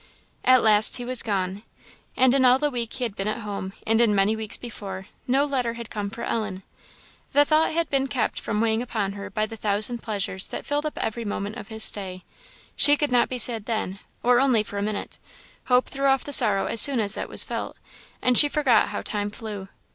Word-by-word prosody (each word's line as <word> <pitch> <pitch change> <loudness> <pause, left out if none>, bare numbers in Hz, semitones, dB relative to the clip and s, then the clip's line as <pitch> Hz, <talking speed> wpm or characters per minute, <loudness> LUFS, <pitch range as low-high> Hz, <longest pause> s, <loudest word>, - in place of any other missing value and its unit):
At 255 0 +5
last 215 -1 +6
he 245 - -6
was 255 0 +2
gone. 195 -2 -3 0.6
And 260 -1 +4
in 270 -1 +3
all 250 0 +6
the 295 +1 -1
week 235 -3 -4
he 255 - -3
had 225 -5 -3
been 195 - -4
at 215 +2 -3
home, 200 -2 -6
and 225 +1 +2
in 220 -3 +3
many 200 +2 +2
weeks 220 -1 -4
before, 195 -5 -8 0.2
no 270 +3 +2
letter 255 -5 -2
had 235 -1 -9
come 205 -2 -4
for 230 - -8
Ellen. 210 -4 -3 0.7
The 290 0 +5
thought 310 +2 +2
had 335 +1 0
been 275 -1 +1
kept 255 -3 -2
from 215 -1 -2
weighing 225 0 +1
upon 220 -5 -3
her 200 0 -8
by 215 +2 -1
the 225 +1 -9
thousand 215 +3 0
pleasures 200 -3 -2
that - - -7
filled 290 +1 -1
up 300 - -7
every 230 +1 -3
moment 205 0 -5
of 205 - -9
his 220 -1 -1
stay; 185 -4 0 0.5
she 290 0 +6
could 295 -2 -1
not 245 -1 +2
be 255 - -3
sad 230 -3 0
then, 215 -4 -3 0.2
or 245 0 +4
only 255 -5 +2
for 205 -1 -6
a - - -3
minute; 210 0 -4 0.5
hope 250 0 +2
threw 275 0 -1
off 270 -1 +2
the 285 - -5
sorrow 210 -6 +4
as 230 - +2
soon 275 -4 +4
as 205 -1 +1
it - - -5
was - - +4
felt; - - -6 0.5
and 250 -1 +6
she 295 - +8
forgot 270 -7 +2
how 205 - -5
time 205 -1 -3
flew. 205 -2 -8
225 Hz, 225 wpm, -24 LUFS, 205-255 Hz, 0.7 s, she